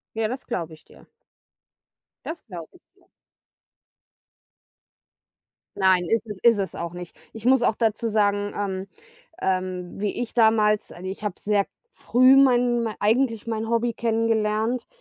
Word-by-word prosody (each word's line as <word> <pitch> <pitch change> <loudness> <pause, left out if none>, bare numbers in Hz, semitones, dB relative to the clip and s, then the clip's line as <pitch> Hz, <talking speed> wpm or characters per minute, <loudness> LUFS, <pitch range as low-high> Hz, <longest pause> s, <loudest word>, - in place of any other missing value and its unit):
Ja, 225 -1 0
das 255 +3 -6
glaube 170 -9 -4
ich 155 - -20
dir. - - -19 1.2
Das 325 0 -6
glaube 175 - -10
ich - - -25
dir. 380 -2 -29 2.7
Nein, 185 -2 +3
ist 225 0 0
es 210 -3 -7
ist 230 -3 +5
es 195 -1 -3
auch 170 0 -5
nicht. 175 -1 -9 0.2
Ich 225 -1 -11
muss 260 -1 +4
auch - - +2
dazu 225 0 0
sagen, 205 -1 +1
ähm, 195 -2 -3 0.5
ähm 185 -1 -2
wie 205 +2 -2
ich 245 - -5
damals 220 -2 +3
also, 180 +2 -8
ich 195 - -8
habe 205 -3 -2
sehr 205 -1 +1 0.3
früh 255 +2 +4
mein 245 -3 +4
mei 220 -2 -3
eigentlich 225 +1 +1
mein 225 -1 -3
Hobby 235 +1 +1
kennengelernt. 225 +1 0
220 Hz, 150 wpm, -24 LUFS, 195-235 Hz, 2.7 s, ist